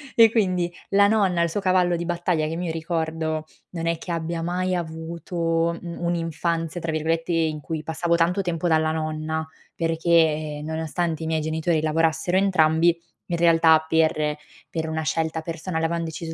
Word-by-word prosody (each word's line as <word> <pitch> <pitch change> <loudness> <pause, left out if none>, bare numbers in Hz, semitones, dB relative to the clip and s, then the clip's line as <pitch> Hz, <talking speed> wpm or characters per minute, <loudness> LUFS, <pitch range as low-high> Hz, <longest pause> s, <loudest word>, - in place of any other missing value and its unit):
E 225 -1 +7
quindi 185 -6 +1 0.2
la 200 0 +5
nonna, 195 -5 +2
il 170 - +2
suo 205 - -2
cavallo 185 -2 +2
di 170 - -4
battaglia, 175 -2 0
che 165 - -3
mi 175 -1 -2
ricordo 160 -1 -2 0.3
non 165 -2 -4
è 165 -1 +1
che 175 - -7
abbia 165 0 -2
mai 180 +2 -1
avuto, 165 0 -2
mhmm, 170 -1 -7
"un'infanzia", 170 0 -1
tra 165 - -2
virgolette, 165 +2 -1
in 160 -2 0
cui 160 0 -4
passavo 170 +1 0
tanto 175 +4 +2
tempo 175 -1 -2
dalla 160 0 +3
nonna, 155 0 -2 0.3
perché 160 -2 +1
nonostante 160 +1 -2
i - - -3
miei 160 -1 0
genitori 160 +1 0
lavorassero 160 +3 +1
entrambi, 170 -3 +3 0.3
in 170 - 0
realtà 165 -1 +5
per 155 -2 +1 0.3
per 160 -1 -3
una 160 0 -2
scelta 160 +1 -1
personale 165 0 -4
avevan 165 0 -1
deciso 160 0 -6
165 Hz, 165 wpm, -24 LUFS, 160-175 Hz, 0.3 s, E